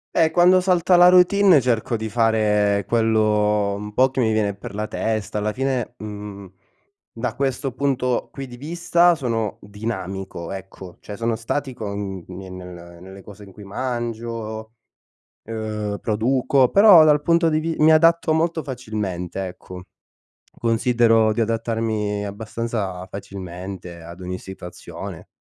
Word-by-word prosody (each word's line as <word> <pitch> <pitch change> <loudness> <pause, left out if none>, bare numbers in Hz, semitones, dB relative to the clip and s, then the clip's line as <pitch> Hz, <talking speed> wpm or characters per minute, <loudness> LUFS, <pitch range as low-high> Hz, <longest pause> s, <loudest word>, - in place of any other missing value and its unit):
Eh, 160 -2 +4
quando 180 +2 +5
salta 180 -1 +3
la 175 +1 +8
routine, 185 -2 +6
cerco 120 -2 0
di 110 0 -4
fare 105 -3 +2
quello 105 -3 +2
un 105 +1 -7
po' 130 0 +4
che 130 - -4
mi 110 -2 +2
viene 105 -2 +1
per 100 - -9
la 105 +1 -2
testa, 110 -1 -2
alla 105 +1 -1
fine, 130 -2 -2
mhmm, 105 -2 -8 0.6
da 115 - -4
questo 135 -1 -2
punto 125 -2 -1
qui 135 -1 -7
di 120 - -10
vista, 170 +4 +2
sono 115 -7 -2
dinamico 95 -4 -6
ecco, 95 -1 -10
cioè 105 - -8
sono 115 -1 -1
statico 115 -3 -4
n 95 -3 -5
ni 95 +1 -8
nel 90 -2 -10
nelle 95 +1 -11
cose 105 0 -12
in 100 - -13
cui 100 +2 -13
mangio, 115 -1 -4 0.7
uhm, 105 -2 -4
produco, 125 +4 +2
però 200 -6 +8
dal 150 -1 +4
punto 170 +1 +3
di 155 0 +1
vi 165 0 -2
mi 160 +1 +6
adatto 165 0 +4
molto 160 0 0
facilmente 105 - -4
ecco, 90 0 -10 0.8
considero 115 -1 +3
di 115 - -1
adattarmi 110 -2 -1
abbastanza 105 -2 -4
facilmente, 95 -2 -8
ad 85 +2 -11
ogni 90 0 -4
situazione. 95 -2 -9
110 Hz, 140 wpm, -22 LUFS, 100-130 Hz, 0.8 s, la